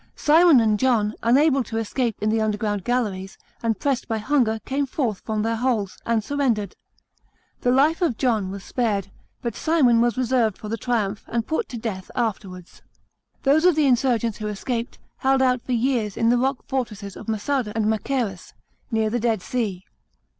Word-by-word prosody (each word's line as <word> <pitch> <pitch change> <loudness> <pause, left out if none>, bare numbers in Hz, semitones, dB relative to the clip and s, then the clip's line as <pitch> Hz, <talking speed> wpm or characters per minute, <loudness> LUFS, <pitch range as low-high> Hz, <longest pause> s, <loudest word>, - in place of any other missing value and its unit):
Simon 320 -2 +6
and 215 -2 +2
John, 225 -5 +2
unable 270 +3 +4
to 225 - -5
escape 225 +1 -1
in 215 +1 +1
the 220 0 +1
underground 210 -2 -1
galleries, 205 -6 -2 0.2
and 225 -3 -1
pressed 275 -3 -1
by 225 - -1
hunger, 225 -1 +1
came 275 +1 -1
forth 245 -7 -2
from 215 -1 -2
their 225 0 0
holes, 225 -5 -1
and 230 -2 +1
surrendered. 235 -7 -1 0.8
The 245 - 0
life 285 +7 +3
of 315 -11 +1
John 220 -7 +1
was 195 0 -7
spared, 205 -6 -1 0.3
but 235 -3 -3
Simon 265 -8 +3
was 240 +1 +1
reserved 245 -4 +1
for 210 - -8
the 225 - -1
triumph, 215 -4 -1
and 230 -1 -1
put 320 - -2
to 240 - -6
death 210 -5 -5
after 220 -5 -1
wards. 180 -1 -13 0.6
Those 285 +4 +4
of 360 -3 +5
the 305 -1 +3
insurgents 240 -4 +1
who 215 - -3
escaped, 230 +3 -4 0.2
held 270 0 +2
out 255 -2 +2
lor 255 - +1
years 230 -4 0
in 230 - +2
the 245 - +4
rock 265 +1 -1
fortresses 215 -7 -4
of - - -10
Massada 225 +2 -1
and 220 -2 +1
Machajrus, 220 -2 -2 0.4
near 220 -2 0
the 240 - 0
Dead 225 -4 0
Sea. 210 -7 -2
230 Hz, 180 wpm, -23 LUFS, 215-260 Hz, 0.8 s, Simon